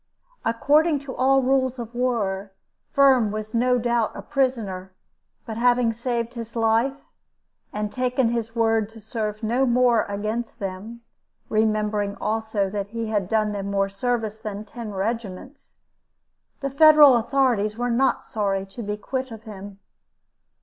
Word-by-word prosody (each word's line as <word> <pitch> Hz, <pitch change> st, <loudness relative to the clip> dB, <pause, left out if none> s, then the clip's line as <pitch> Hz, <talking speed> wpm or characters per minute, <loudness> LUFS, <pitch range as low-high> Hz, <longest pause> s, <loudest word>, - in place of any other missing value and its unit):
According 295 Hz, +7 st, +3 dB
to 275 Hz, -2 st, -8 dB
all 270 Hz, +1 st, +3 dB
rules 260 Hz, 0 st, +1 dB
of 235 Hz, -1 st, -7 dB
war, 210 Hz, -6 st, -1 dB, 0.4 s
Firm 265 Hz, -5 st, +5 dB
was 215 Hz, +1 st, -5 dB
no 250 Hz, +2 st, +3 dB
doubt 235 Hz, -2 st, 0 dB
a -, -, -7 dB
prisoner; 225 Hz, -10 st, -1 dB, 0.5 s
but 220 Hz, -1 st, -6 dB
having 245 Hz, -1 st, +3 dB
saved 235 Hz, 0 st, -3 dB
his 230 Hz, -1 st, -8 dB
life, 230 Hz, +4 st, +2 dB, 0.8 s
and 210 Hz, 0 st, -3 dB
taken 255 Hz, -1 st, +1 dB
his 230 Hz, -1 st, -3 dB
word 225 Hz, -2 st, +2 dB
to 225 Hz, 0 st, -13 dB
serve 215 Hz, 0 st, -4 dB
no 240 Hz, +4 st, +1 dB
more 240 Hz, -2 st, +3 dB
against 215 Hz, +3 st, -4 dB
them, 205 Hz, +3 st, -6 dB, 0.5 s
remembering 215 Hz, -2 st, 0 dB
also 220 Hz, -2 st, -1 dB
that 200 Hz, -1 st, -3 dB
he 225 Hz, +1 st, -4 dB
had 205 Hz, -4 st, -1 dB
done 215 Hz, -1 st, +1 dB
them 200 Hz, -1 st, -4 dB
more 195 Hz, 0 st, 0 dB
service 220 Hz, +1 st, -2 dB
than 210 Hz, -1 st, -6 dB
ten 225 Hz, 0 st, -8 dB
regiments, 220 Hz, +5 st, -5 dB, 0.8 s
the 275 Hz, -1 st, -2 dB
Federal 300 Hz, -1 st, +8 dB
authorities 235 Hz, -4 st, +1 dB
were 245 Hz, 0 st, -1 dB
not 260 Hz, +3 st, +1 dB
sorry 195 Hz, -3 st, -2 dB
to 195 Hz, +5 st, -9 dB
be 210 Hz, -1 st, -3 dB
quit 260 Hz, +4 st, -4 dB
of 225 Hz, -1 st, -10 dB
him. 200 Hz, -2 st, -10 dB
225 Hz, 145 wpm, -24 LUFS, 210-250 Hz, 0.8 s, Federal